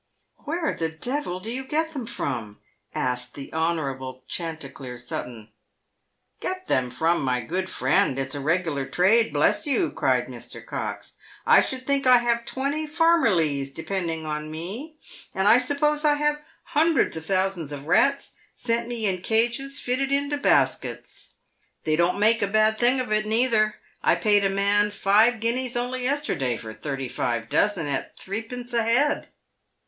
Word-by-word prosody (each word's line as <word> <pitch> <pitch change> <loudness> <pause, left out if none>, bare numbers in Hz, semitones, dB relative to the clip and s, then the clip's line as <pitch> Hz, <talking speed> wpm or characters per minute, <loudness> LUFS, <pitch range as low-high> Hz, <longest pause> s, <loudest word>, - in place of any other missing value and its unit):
" - - -50
Where 325 +2 -1
the 165 -1 -2
devil 185 - -4
do 220 +5 -5
you 260 +2 -3
get 320 +4 -1
them 260 -6 -5
from 115 - -4 0.2
?" 105 - -49
asked 125 0 -2
the 140 - -9
Honourable 135 -6 -2
Chanticleer 140 -7 -6
Sutton. 120 -2 -6 0.5
" - - -50
Get 370 0 -4
them 125 -1 +1
from, 165 +7 +1
my 125 -2 0
good 185 +9 -3
friend? 130 0 +2
It's 135 0 -2
a 145 - -2
regular 155 -2 -1
trade, 220 +6 +3
bless - - +2
you," 290 +5 +2
cried - - +1
Mr. - - -10
Cox. - - -5
" - - -22
I - - +8
should 255 -1 -2
think 280 -1 +1
I 250 -1 +8
have 235 -1 0
twenty 285 +4 -2
farmmerlies 205 - +2
depend 175 +4 -3
ing 160 -1 -4
on 150 0 -4
me, 205 - -6 0.4
and 190 +1 +1
I 230 +4 +7
suppose 295 +3 0
I 295 -1 +4
have 295 0 0 0.2
hundreds 315 - +2
of 160 0 -6
thousands 185 -5 0
of 145 -1 -7
rats 275 - +2 0.2
sent 235 0 -1
me 235 -2 -3
in 190 -2 +1
iron - - -15
cages 240 +5 +1
fitted 265 +2 -1
into 285 +1 +1
baskets. 285 - 0 0.5
They 155 - +1
don't 175 +4 +1
make 225 +2 +4
a 200 - +2
bad 215 +1 +2
thing 245 +2 +3
of 250 -4 -3
it 215 0 +1
neither. 220 -2 +2 0.3
I - - +3
paid 205 -1 +3
a 195 - +3
man 200 +1 +3
five 210 +3 +3
guineas 240 +2 0
only 250 +1 -2
yesterday 250 - -1
for 110 0 -8
thirty 135 +1 -4
five 115 -2 -2
dozen, 205 -6 +1
at 140 -2 -4
threepence 235 +5 -6
ahead. 235 +5 +2
210 Hz, 170 wpm, -25 LUFS, 155-255 Hz, 0.5 s, I